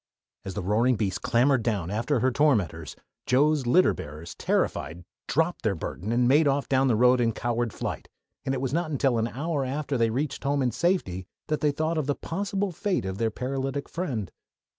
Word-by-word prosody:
As 95 -1 -6
the 105 - -3
roaring 115 +6 +2
beast 100 -3 -2
clambered 130 +2 +3
down 100 -6 -1
after 120 +4 0
her 130 +2 +3
tormentors, 105 - +1 0.3
Joe's 140 +1 +3
litter 180 +9 +5
bearers, 80 +3 -8
terrified, 85 +3 -1 0.2
dropped 165 +4 0
their 110 -5 0
burden 95 +5 -5
and 120 +1 +3
made 145 +4 +5
off 140 0 +1
down 135 0 +3
the 120 - +3
road 125 +2 +4
in 115 -1 +2
coward 120 0 -1
flight, - - -5 0.3
and 135 0 -1
it 130 - -3
was 135 0 -2
not 170 0 0
until 135 -5 +1
an 110 - +1
hour 145 +4 -2
after 135 0 -2
they 115 - +4
had 110 - -3
reached 140 +1 -2
home 140 0 +1
in 125 - +1
safety 115 - 0 0.2
that 155 - 0
they 150 - +3
thought 155 +3 -1
of 145 - -2
the 145 - +1
possible 195 +2 -2
fate 185 - -1
of 95 +2 -4
their 115 -1 +2
paralytic 135 +4 -3
friend. 125 - -3
130 Hz, 205 wpm, -26 LUFS, 110-145 Hz, 0.3 s, litter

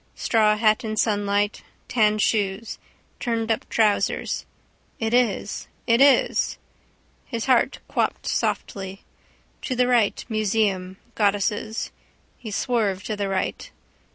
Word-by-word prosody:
Straw 215 -2 +2
hat 215 +2 +3
in 215 -1 -3
sunlight. 205 -1 +1 0.3
Tan 215 -3 +3
shoes. 210 0 0 0.4
Turnedup 225 -2 -1
trousers. 215 -2 +1 0.5
It 225 0 -2
is. 240 -4 0 0.2
It 235 +1 +3
is. 280 -1 +4 0.7
His 230 -3 -3
heart 255 -3 +3
quopped - - -1
softly. 195 0 -2 0.6
To 255 - -3
the 250 0 +3
right. 235 -5 +2
Museum. 205 -4 0 0.2
Goddesses. 205 +1 0 0.5
He 230 - -7
swerved 205 -3 0
to 215 - -2
the 200 -1 -2
right. 190 -1 -2
215 Hz, 110 wpm, -24 LUFS, 205-230 Hz, 0.7 s, is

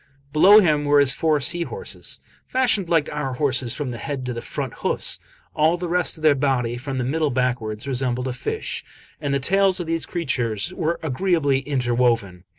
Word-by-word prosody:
Below 195 +7 +8
him 150 -5 +2
were 145 0 +4
his 140 -1 +5
four 155 -2 +1
sea 170 +5 +1
horses, 465 - -5 0.3
fashioned 235 -8 +1
like 160 -3 +2
our 145 -3 -3
horses 130 -3 0
from 145 -4 -3
the 120 - -7
head 135 +2 -4
to 125 - -3
the 115 - -5
front - - -5
hoofs; - - 0 0.3
all 160 +3 +2
the 175 0 -4
rest 175 -1 0
of 155 - -13
their 155 -2 +6
body, 130 -4 0
from 130 +2 -5
the 125 - -1
middle 155 +4 0
backwards, 125 -4 -1
resembled 125 -1 -1
a 130 - -2
fish, 125 - -4 0.4
and 145 - -2
the 140 - +1
tails 190 +6 +3
of 175 - -3
these 165 0 -2
creatures 125 - -2
were 170 -1 -1
agreeably 150 -2 +1
inter 125 -4 0
woven. 115 -7 0
140 Hz, 195 wpm, -22 LUFS, 125-165 Hz, 0.4 s, Below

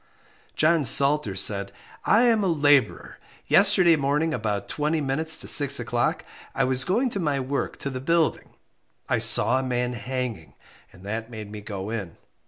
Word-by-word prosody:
John 160 0 +2
Salter 140 -4 +2
said 100 +1 0 0.3
I 230 - +3
am 230 -4 +2
a - - 0
labourer; 145 -5 +1 0.3
yesterday 190 -4 +4
morning 150 +3 -1
about 105 -6 -3
twenty 155 +2 -2
minutes 155 +3 -1
to - - -8
six 140 -3 +5
o'clock, 120 0 -2 0.3
I - - +1
was 130 0 +1
going 235 - 0
to 200 - -4
my 145 -5 -1
work 135 +2 -4
to 140 - -5
the 130 -1 -6
building, 165 +2 0 0.6
I - - 0
saw 130 +2 +3
a - - -4
man 125 -1 -2
hanging, 125 -7 -6 0.4
and 90 - -18
that 110 +3 -5
made 110 -3 -9
me 105 -1 -8
go 100 0 -7
in. 100 -7 -6
135 Hz, 170 wpm, -24 LUFS, 115-160 Hz, 0.6 s, six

